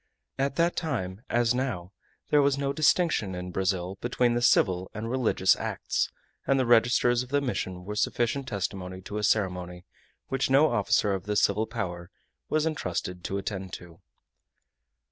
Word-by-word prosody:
At 140 Hz, +1 st, 0 dB
that 170 Hz, +1 st, +2 dB
time, 110 Hz, -, -3 dB
as 120 Hz, 0 st, +2 dB
now, 125 Hz, -9 st, -3 dB, 0.4 s
there 150 Hz, -, +6 dB
was 140 Hz, -1 st, +2 dB
no 140 Hz, 0 st, -1 dB
distinction 145 Hz, -, +2 dB
in 90 Hz, 0 st, -5 dB
Brazil 95 Hz, 0 st, -1 dB
between 120 Hz, 0 st, +1 dB
the 120 Hz, -, 0 dB
civil 95 Hz, -6 st, +3 dB
and 110 Hz, +1 st, -4 dB
religious 115 Hz, -7 st, +3 dB
acts, -, -, -2 dB, 0.4 s
and 135 Hz, 0 st, +3 dB
the 130 Hz, -, +2 dB
registers 120 Hz, +1 st, +4 dB
of 125 Hz, -, -7 dB
the 145 Hz, +1 st, +2 dB
mission 95 Hz, -9 st, -3 dB
were 105 Hz, -, -4 dB
sufficient 120 Hz, +5 st, 0 dB
testimony 95 Hz, -4 st, -4 dB
to 100 Hz, +3 st, -5 dB
a -, -, -4 dB
ceremony 90 Hz, -4 st, 0 dB, 0.4 s
which 135 Hz, 0 st, -1 dB
no 140 Hz, +4 st, +5 dB
officer 105 Hz, 0 st, +2 dB
of 95 Hz, -1 st, -4 dB
the 105 Hz, -, -1 dB
civil 105 Hz, +2 st, +2 dB
power 85 Hz, -5 st, -5 dB, 0.4 s
was 155 Hz, 0 st, +1 dB
intrusted 90 Hz, -, -3 dB
to 100 Hz, -, -2 dB
attend 95 Hz, -1 st, -5 dB
to. 85 Hz, +1 st, -10 dB
105 Hz, 165 wpm, -27 LUFS, 95-130 Hz, 0.4 s, there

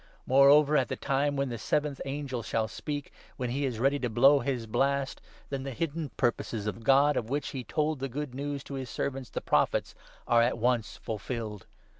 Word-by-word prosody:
Moreover 140 Hz, +3 st, +6 dB
at 130 Hz, -, +2 dB
the -, -, -3 dB
time 140 Hz, +1 st, 0 dB
when 140 Hz, -1 st, 0 dB
the 120 Hz, -2 st, -5 dB
seventh 145 Hz, +4 st, -1 dB
angel 135 Hz, -3 st, -3 dB
shall 110 Hz, 0 st, -1 dB
speak, 145 Hz, +6 st, -5 dB, 0.2 s
when 125 Hz, -1 st, -2 dB
he 140 Hz, +3 st, 0 dB
is 125 Hz, -4 st, -2 dB
ready 135 Hz, +4 st, +2 dB
to 125 Hz, -, -1 dB
blow 135 Hz, +6 st, +6 dB
his 130 Hz, -4 st, -2 dB
blast, 135 Hz, +4 st, 0 dB, 0.3 s
then 135 Hz, -1 st, -2 dB
the 135 Hz, -, -4 dB
hidden 160 Hz, 0 st, -2 dB
purposes 115 Hz, -3 st, -1 dB
of 105 Hz, +2 st, -4 dB
God, 140 Hz, +3 st, +5 dB
of 115 Hz, -, -2 dB
which 145 Hz, +1 st, -1 dB
he 130 Hz, -2 st, -5 dB
told 150 Hz, +4 st, -1 dB
the 135 Hz, +1 st, -3 dB
good 145 Hz, +1 st, -4 dB
news 140 Hz, +1 st, -4 dB
to -, -, -9 dB
his 130 Hz, -3 st, -4 dB
servants, 135 Hz, -1 st, -3 dB
the -, -, -4 dB
Prophets, -, -, +1 dB, 0.3 s
are 120 Hz, -1 st, +5 dB
at 120 Hz, +1 st, +2 dB
once 120 Hz, -1 st, 0 dB
fulfilled. 110 Hz, -2 st, -5 dB
135 Hz, 200 wpm, -29 LUFS, 120-140 Hz, 0.3 s, Moreover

